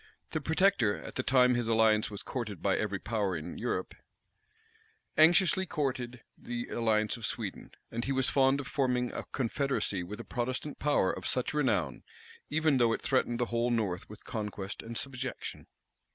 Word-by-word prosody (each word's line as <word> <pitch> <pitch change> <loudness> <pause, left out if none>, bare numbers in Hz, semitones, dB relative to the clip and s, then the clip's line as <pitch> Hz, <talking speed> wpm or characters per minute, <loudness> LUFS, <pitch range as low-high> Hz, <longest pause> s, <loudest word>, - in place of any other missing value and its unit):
The 155 - -1
protector, 160 - +3
at - - -8
the - - -1
time 125 -1 +4
his 120 -1 0
alliance 110 -1 +4
was 105 -1 -6
courted 110 - -4
by 95 +2 +2
every 105 -2 -1
power 100 -3 -1
in 75 - -7
Europe, - - -2 1.2
anxiously 175 +3 +5
courted 125 -5 -2
the 120 0 -5
alliance 110 -2 +1
of 115 - -4
Sweden; - - -5 0.2
and 115 +1 -2
he 135 - -1
was 130 -1 +2
fond 135 0 +3
of 140 - -4
forming 125 -2 0
a - - -4
confederacy 125 -6 -1
with 95 +4 -7
a - - -5
Protestant 130 +4 -3
power 145 -10 +3
of 95 - -5
such 125 +3 0
renown, 150 -4 +1 0.5
even 155 -2 +3
though 120 -2 +4
it - - -4
threatened 125 -3 +1
the 120 - +2
whole 120 +1 +2
north 105 -6 -1
with 105 - -11
conquest 105 -2 -5
and 115 0 -6
subjection. 130 -1 -4
120 Hz, 170 wpm, -31 LUFS, 110-135 Hz, 1.2 s, anxiously